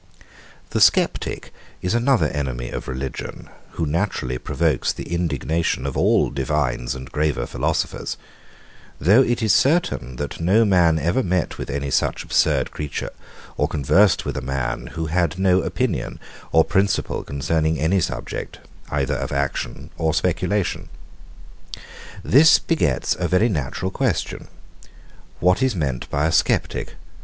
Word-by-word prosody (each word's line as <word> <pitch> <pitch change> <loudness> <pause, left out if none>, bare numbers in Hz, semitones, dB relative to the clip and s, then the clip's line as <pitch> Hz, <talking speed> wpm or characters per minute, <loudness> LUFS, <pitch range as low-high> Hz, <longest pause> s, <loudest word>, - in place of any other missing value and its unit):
The - - 0
Sceptic - - +2 0.3
is 90 - 0
another 120 - +3
enemy 65 -4 -3
of - - -5
religion, 65 +1 -6 0.2
who 80 - -2
naturally 75 -6 -1
provokes 80 -2 0
the - - -6
indignation 80 -3 -1
of 70 - -3
all - - +3
divines 65 -3 -1
and 65 +1 -9
graver 75 -5 0
philosophers; - - -2 0.8
though 100 - +5
it 120 -2 +1
is 110 -2 +4
certain, 135 - +1
that 70 +3 -5
no 100 +7 +4
man 90 -5 +4
ever 85 - +1
met 90 -6 -1
with - - -5
any 70 -1 -3
such - - 0
absurd - - +1
creature, 75 -1 -4 0.5
or - - +2
conversed 90 +8 +3
with - - -3
a 65 - -3
man, 65 -2 -3
who 80 +5 -4
had 85 +1 0
no 95 -1 +3
opinion - - -2 0.3
or 80 - +5
principle 100 0 0
concerning 80 +3 -1
any 85 +6 +2
subject, - - -4 0.3
either 70 -3 0
of - - -4
action 70 0 -3
or 80 0 +1
speculation. 90 +3 -1 1.3
This 155 +4 +7
begets 150 - 0
a - - 0
very 105 +6 +3
natural 85 - -2
question; 125 - -2 0.9
What 90 - +3
is 130 -4 +2
meant 70 -7 -2
by 70 +1 0
a 80 - +2
sceptic? 80 - 0
80 Hz, 140 wpm, -22 LUFS, 70-95 Hz, 1.3 s, This